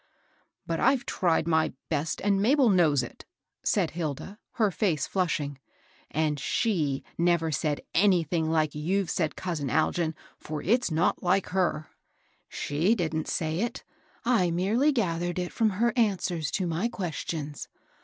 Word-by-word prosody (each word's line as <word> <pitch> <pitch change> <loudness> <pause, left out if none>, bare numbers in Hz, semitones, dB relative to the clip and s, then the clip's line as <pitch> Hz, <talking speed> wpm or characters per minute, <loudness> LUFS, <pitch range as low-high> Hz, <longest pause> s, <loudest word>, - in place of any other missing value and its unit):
" - - -42
But 165 -1 -2
IVe 265 -2 +3
tried 165 -3 +1
my 160 -1 +2 0.2
best, 155 0 -1
and 200 -1 +2
Mabel 260 +3 +4
knows 155 -8 +4
it,'* 120 - -9 0.4
said - - +1
Hilda, 170 +5 -5
her 215 -4 +2
face 165 -7 0
flushing. 150 -7 -1 0.3
" - - -32
And 150 -1 0
Bhe 155 - 0 0.2
never 170 -2 +2
said 145 0 -1
anything 170 -4 +2
like 155 -1 +2
what - - -19
you've 190 +3 0
said, 160 -4 -1
cousin 160 -7 -3
Algin, 160 +2 +1 0.2
for 150 -1 -5
it's 240 +5 +2
not 160 +2 +1
like 185 +2 +1
her." 175 -5 0 0.6
She 165 +10 +1
didn't 160 -5 -2
say 160 0 -1
it. 235 +3 -2 0.4
I 230 -8 +3
merely 205 - +2
gathered 175 - -1
it 180 -1 -3
from 225 -1 +2
her 235 +5 +1
answers 185 - 0
to 190 - -1
my 170 +6 0
questions. 160 - -4
170 Hz, 155 wpm, -27 LUFS, 155-195 Hz, 0.6 s, Mabel